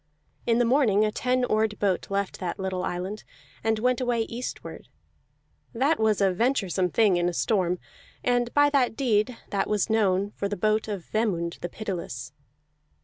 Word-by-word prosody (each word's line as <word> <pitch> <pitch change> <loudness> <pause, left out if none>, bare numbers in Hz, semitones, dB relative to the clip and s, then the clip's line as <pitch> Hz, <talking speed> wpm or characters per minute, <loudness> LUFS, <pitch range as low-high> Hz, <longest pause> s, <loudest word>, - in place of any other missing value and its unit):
In 230 -1 +3
the 245 - +3
morning 230 -5 +3
a 215 - 0
ten 250 +3 0
oared 215 -2 +1
boat 195 -3 0
left 200 0 -2
that 180 0 -3
little 190 -2 -2
island, 185 +4 -4 0.4
and 225 0 +1
went 250 +3 +1
away 245 -2 +1
eastward; 235 +2 -6 0.9
that 270 +6 +2
was 215 -2 +2
a 195 -2 +3
venturesome 190 -5 +1
thing 205 -2 +3
in 175 0 +1
a - - -5
storm, 180 -2 +1 0.5
and 245 -1 +1
by 290 0 +5
that 260 -5 +2
deed 230 -2 +1
that 200 - 0
was 210 +1 +1
known 200 -2 +2
for 200 - -3
the 205 - -3
boat 215 +3 +1
of 200 -5 -4
Vemund 180 -7 -1
the 175 - -4
Pitiless. 170 - -5
215 Hz, 170 wpm, -26 LUFS, 190-235 Hz, 0.9 s, by